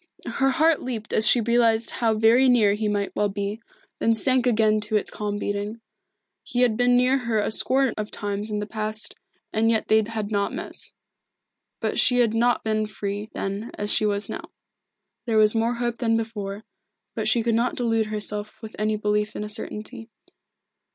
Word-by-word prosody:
Her 270 0 +1
heart 320 +2 +3
leaped 230 -4 -5
as 220 - +3
she 240 - +5
realised 230 0 +2
how 225 -2 0
very 235 +4 +5
near 220 -5 +4
he 210 +1 -2
might 205 -1 -2
well 205 - +1
be, 200 +2 -4 0.4
then 225 0 +2
sank 255 +2 +2
again 215 -2 +3
to 210 +1 -3
its 210 - 0
calm 205 -1 -3
beating. 205 +2 -3 0.6
He 245 - -2
had 240 -3 +3
been 245 +1 +3
near 255 +2 +3
her 235 -3 -1
a 210 - 0
score 265 +2 +3
of 215 0 -4
times 205 0 -3
in 210 - -2
the 210 - -2
past 215 0 -2
years, - - -41
and 225 +1 +2
yet 220 -1 0
they 220 0 +5
had 215 -1 -4
not 200 -1 0
met. - - -6 1.1
But - - 0
she 250 - +4
had 235 -3 +3
not 240 +2 +2
been 215 -1 0
free, 205 0 -5
then, 200 +4 -4
as 205 0 0
she 215 - +2
was 205 0 -1
now. - - -6 0.8
There 225 -2 +1
was 215 -1 +5
more 230 +1 0
hope 240 -1 -2
than 225 -2 +2
before, 210 -2 -5 0.5
but - - -2
she 235 - +3
could 230 0 +1
not 235 +2 +1
delude 225 -3 0
herself 210 0 -4
with 220 -2 -10
any 215 0 0
belief 210 0 -1
in - - -4
a 210 - -6
certainty. 225 +2 -5
220 Hz, 195 wpm, -24 LUFS, 210-235 Hz, 1.1 s, she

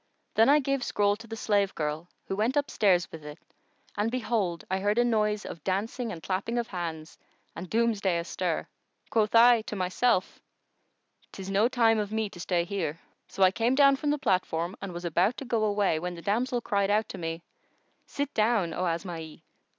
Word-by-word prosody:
Then 225 +4 +5
I 290 - +7
gave 275 -1 0
the 250 - -4
scroll 205 0 +2
to 230 +1 -12
the 225 - -6
slave 205 -3 +1
girl, 155 +2 -3 0.2
who 195 - -3
went 225 +7 0
upstairs 200 -11 +2
with 160 -2 -9
it, 150 0 -9 0.6
and 210 +2 0
behold, 220 -8 -1
I 190 +1 -1
heard 205 +3 0
a 240 - +4
noise 210 -3 +1
of 160 - -8
dancing 220 +5 -2
and 165 -4 -8
clapping 200 +5 -2
of 235 -1 -2
hands 165 -4 -6 0.4
and 175 +2 -7
Doomsday 215 -6 +1
astir. 170 0 -2 0.4
Quoth 215 -1 +1
I 235 0 +7
to 215 - -6
myself, 185 +2 0 0.9
"'Tis 195 0 -7
no 205 +4 +3
time 230 -3 +3
of 205 -1 -3
me 220 -2 -1
to 175 - -12
stay 175 -1 0
here." 170 -4 -3 0.3
So 195 - 0
I 185 - +6
came 235 +5 +1
down 275 0 +6
from 295 +2 -2
the 295 - +2
platform 180 - 0
and 195 -1 -5
was 175 0 -7
about 175 +8 +1
to 275 - -6
go 230 -3 0
away, 205 -6 +1
when 180 +1 -4
the 170 - -10
damsel 240 +4 0
cried 200 -3 0
out 210 +1 +2
to - - -7
me, 165 0 -4 0.6
'Sit 285 0 -3
down, 215 -6 +1
O 180 +2 -1
Asma'i! 165 -2 -5
205 Hz, 195 wpm, -28 LUFS, 175-230 Hz, 0.9 s, I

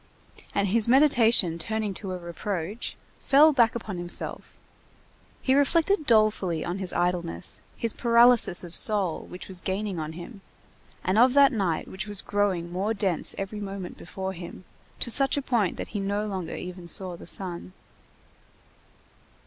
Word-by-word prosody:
And 200 -1 +1
his 225 +2 +4
meditation 235 - +4
turning 215 +2 -3
to 190 0 -6
a 185 - -4
reproach, 180 +4 -5 0.2
fell 300 +3 +5
back 235 -4 +3
upon 210 -6 -5
himself; 175 0 -3 0.9
he 260 - +2
reflected 310 +5 +2
dolefully 215 -7 +2
on 175 +2 -4
his 190 -2 -1
idleness, 175 0 -2 0.2
his 230 -2 0
paralysis 235 -6 +4
of 170 -1 -10
soul, 200 -6 +2
which 180 0 -9
was 185 -2 -4
gaining 195 -1 -3
on 155 0 -5
him, 185 +5 -10 0.6
and 190 +4 +1
of 250 +2 +5
that 280 -1 +6
night 195 - -1
which 190 +2 -6
was 205 -2 -2
growing 190 -4 -1
more 200 +5 -2
dense 195 -5 0
every 195 +2 -5
moment 195 -2 -6
before 190 +2 -6
him, 175 +1 -10 0.4
to 240 - 0
such 275 +3 +6
a - - +2
point 230 -9 0
that - - -6
he 210 - -4
no 200 +2 -2
longer 190 -5 -5
even 180 -1 -8
saw 185 0 -2
the 170 - -13
sun. 180 -1 -5
195 Hz, 155 wpm, -26 LUFS, 180-230 Hz, 0.9 s, that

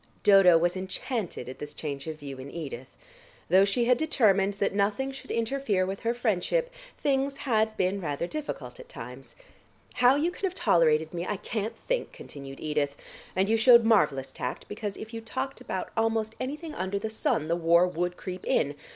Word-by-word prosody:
Dodo 195 -4 +7
was 175 +2 +1
enchanted 190 - -4
at 130 - -8
this 150 0 -7
change 140 -1 -5
of 160 -1 -4
view 140 -3 -8
in 130 +2 -8
Edith. 140 -5 -7 0.5
Though 190 +3 +6
she 235 +4 +1
had 250 0 +4
determined 205 -10 +3
that 200 -1 0
nothing 205 +7 0
should 270 - -10
interfere 230 -5 0
with 195 +1 -4
her 230 +1 -1
friendship, 240 - 0 0.3
things 275 0 0
had 220 -5 +1
been 190 +2 0
rather 150 -1 -2
difficult 305 - -6
at - - -12
times. - - -10 0.6
"How 250 +2 +5
you 315 +5 +1
can 390 - -4
have 370 -1 -2
tolerated 160 - +3
me, 175 +1 -3
I 210 - -1
can't 220 +2 -4
think," - - -1
continued 135 -1 -10
Edith. 150 -2 -1 0.4
"And 190 +1 +2
you 225 +1 +3
showed 235 +1 +7
marvellous 150 - +3
tact, 125 - -5
because 210 -1 -5
if 220 +1 -9
you 225 - -5
talked 260 +4 -4
about 185 - -4
almost 225 -1 0
anything 300 +5 -4
under 190 -2 -2
the 220 +2 -3
sun 220 - 0
the 170 - +1
war 170 +1 +4
would 180 0 -2
creep 185 0 -6
in. 145 0 +1
200 Hz, 185 wpm, -28 LUFS, 170-240 Hz, 0.6 s, Dodo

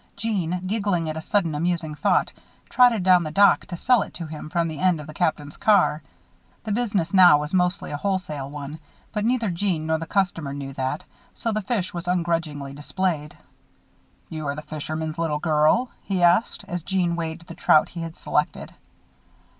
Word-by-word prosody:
Jeanne, 180 -5 -2
giggling 200 -5 0
at - - -7
a 160 - -4
sudden 175 -2 0
amusing 165 0 -1
thought, 150 - +1 0.4
trotted 245 -6 +5
down 180 -1 +5
the 155 - -3
dock 200 +6 +4
to 175 -4 -6
sell 245 +4 +3
it - - -7
to 170 - -5
him 155 -1 -8
from 170 +1 0
the 155 -3 -6
end 180 -2 +2
of 150 - -8
the 155 - -10
Captain's 150 -3 -2
car. 195 -7 +3 0.6
The 215 - -4
business 200 -6 -1
now 180 -5 +8
was 150 +3 -5
mostly 180 +1 +2
a 145 - -3
wholesale 180 -7 -3
one; 145 +1 -7 0.3
but 210 -2 -1
neither 230 -3 +1
Jeanne 170 -3 -1
nor 160 0 0
the 165 - -6
customer 170 -8 -1
knew 135 -1 -6
that, 130 +3 -3 0.3
so 230 - -2
the 215 0 -1
fish 200 -2 -2
were 170 - -3
ungrudgingly 165 -5 -1
displayed. 150 +1 -3 0.9
"Be 160 - -5
you 145 -2 -3
the 150 - -7
fishman's 155 +1 -5
little 160 -3 0
girl?" 155 +10 +2
he 190 -3 -1
asked, 175 +6 +3
as 175 0 -3
Jeanne 180 -1 0
weighed 165 0 -4
the 170 - -11
trout 155 - +4
he 170 - -7
had 165 -1 -7
selected. - - -2
170 Hz, 185 wpm, -24 LUFS, 155-190 Hz, 0.9 s, now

